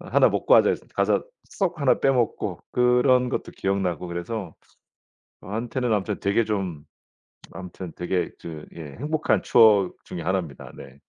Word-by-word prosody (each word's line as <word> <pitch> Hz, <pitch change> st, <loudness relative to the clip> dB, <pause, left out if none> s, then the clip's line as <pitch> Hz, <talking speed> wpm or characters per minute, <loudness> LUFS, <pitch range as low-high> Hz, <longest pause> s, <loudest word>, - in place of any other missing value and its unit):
"1 -, -, +3 dB
먹고 -, -, +3 dB
하자." -, -, +7 dB
그래서 -, -, -4 dB
가서 -, -, +1 dB, 0.2 s
쏙 175 Hz, -5 st, -3 dB
1 140 Hz, -, +3 dB
빼 135 Hz, -, +4 dB
먹고 120 Hz, -4 st, -1 dB
그런 125 Hz, +1 st, +3 dB
것도 -, -, -4 dB
기억나고 95 Hz, -3 st, -2 dB
그래서 85 Hz, +2 st, -5 dB, 0.9 s
저한테는 115 Hz, +4 st, -3 dB
아무튼 105 Hz, 0 st, -1 dB
되게 100 Hz, +3 st, +2 dB
좀 95 Hz, -8 st, -3 dB, 0.7 s
아무튼 90 Hz, -1 st, -8 dB
되게 90 Hz, -1 st, -1 dB
그 80 Hz, -3 st, -8 dB
예 75 Hz, -4 st, -9 dB
행복한 155 Hz, +2 st, 0 dB
추억 105 Hz, -5 st, +5 dB
중에 85 Hz, -, -6 dB
1 95 Hz, +3 st, +1 dB
입니다. 75 Hz, -7 st, -9 dB
네. 70 Hz, +2 st, -13 dB
100 Hz, 280 characters per minute, -24 LUFS, 85-125 Hz, 0.9 s, 하자